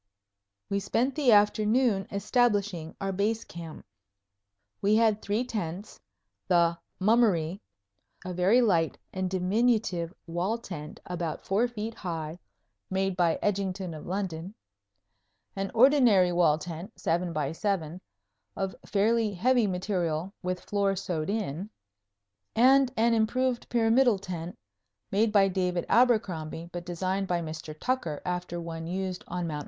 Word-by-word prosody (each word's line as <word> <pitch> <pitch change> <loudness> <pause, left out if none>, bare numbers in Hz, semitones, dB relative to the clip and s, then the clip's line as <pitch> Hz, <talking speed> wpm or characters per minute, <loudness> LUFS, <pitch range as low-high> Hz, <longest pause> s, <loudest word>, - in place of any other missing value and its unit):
We 200 - 0
spent 235 +7 0
the 275 -3 +3
afternoon 210 0 +3
establishing 200 -5 0
our 195 -1 -2
Base 210 +4 0
Camp. 165 -2 -9 1.0
We 205 +2 +3
had 220 -2 +3
three 210 +4 0
tents, 205 -5 -5 0.5
the 170 -2 +3 0.2
"Mummery," 195 -4 +2 0.6
a 185 - -4
very 195 +8 +4
light 170 -8 +2 0.2
and 185 -1 -2
diminutive 190 -2 +1
wall 180 +7 -1
tent 160 -9 -8
about 175 -3 -4
four 210 +6 +2
feet 225 -1 -5
high, 165 -4 -5 0.5
made 190 0 0
by 170 -3 +2
Edgington 190 -3 -1
of 150 - -9
London; 185 0 -4 1.0
an 195 0 -2
ordinary 235 -8 +5
wall 170 -3 +3
tent, 170 +6 -7
7 175 +1 0
by 150 -3 -1
7, 180 -2 -2 0.5
of 195 -2 -3
fairly 215 +2 +1
heavy 240 +3 +3
material, 180 -2 -2
with 180 0 -3
floor 200 -1 0
sewed 165 -3 -3
in; 200 -3 -3 0.9
and 260 +2 +5
an 230 +1 +3
improved 240 +3 0
pyramidal 235 0 +4
tent, 180 -2 -6 0.5
made 210 +3 +2
by 200 -2 +5
David 180 -2 -1
Abercrombie, 175 -9 +1
but 175 0 -7
designed 185 +2 -1
by 175 -1 0
Mr. 155 -1 -7
Tucker 250 - -1
after 180 -1 -3
one 165 -1 -6
used 185 +1 -3
on 175 0 -3
Mt. 155 -3 -3
190 Hz, 130 wpm, -28 LUFS, 170-220 Hz, 1.0 s, ordinary